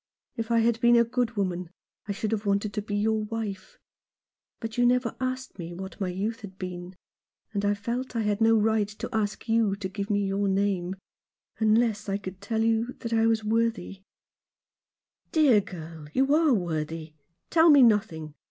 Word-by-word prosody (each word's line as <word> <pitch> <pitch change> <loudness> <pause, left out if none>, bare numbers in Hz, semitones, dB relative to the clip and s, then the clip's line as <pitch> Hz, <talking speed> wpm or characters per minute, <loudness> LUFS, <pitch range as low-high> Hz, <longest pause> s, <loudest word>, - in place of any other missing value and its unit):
If 225 0 -4
I 230 -1 +3
had 230 +1 +1
been 240 -1 +6
a 235 - +6
good 240 -1 -2
woman 180 -3 -2 0.4
I - - -2
should 205 +2 -3
have 220 -2 -1
wanted 200 +1 0
to 210 - -2
be 205 0 -4
your 215 +1 +1
wife. 210 -3 -5 0.8
But 225 -2 -5
you 245 - +2
never 245 -1 +2
asked 255 -3 -4
me 170 0 -6
what 190 +3 -8
my 190 - 0
youth 205 +5 -3
had 190 -3 -10
been, 180 0 -7 0.6
and 200 -1 -1
I 205 0 +2
felt 240 +5 -4
I 230 - +1
had 210 +1 0
no 225 0 +5
right 220 -1 +2
to 210 +1 -7
ask 210 +1 -2
you 225 -3 +2
to 200 -1 -4
give 200 +2 -5
me 205 -1 +1
your 195 +1 0
name, 190 -2 0 0.6
unless 220 -1 +2
I 195 - 0
could 190 -1 -8
tell 220 +2 -1
you 225 +2 +1
that 230 -1 -3
I 225 0 +3
was 225 -1 +1
worthy 225 -3 -1 0.6
" - - -54
"Dear 280 -10 +5
girl, 165 -5 -9
you 270 +2 +3
are 315 -1 +4
worthy. 160 -3 -3 0.4
Tell 330 0 +6
me 285 -3 +8
nothing. 200 -9 +2
210 Hz, 190 wpm, -27 LUFS, 195-230 Hz, 0.8 s, me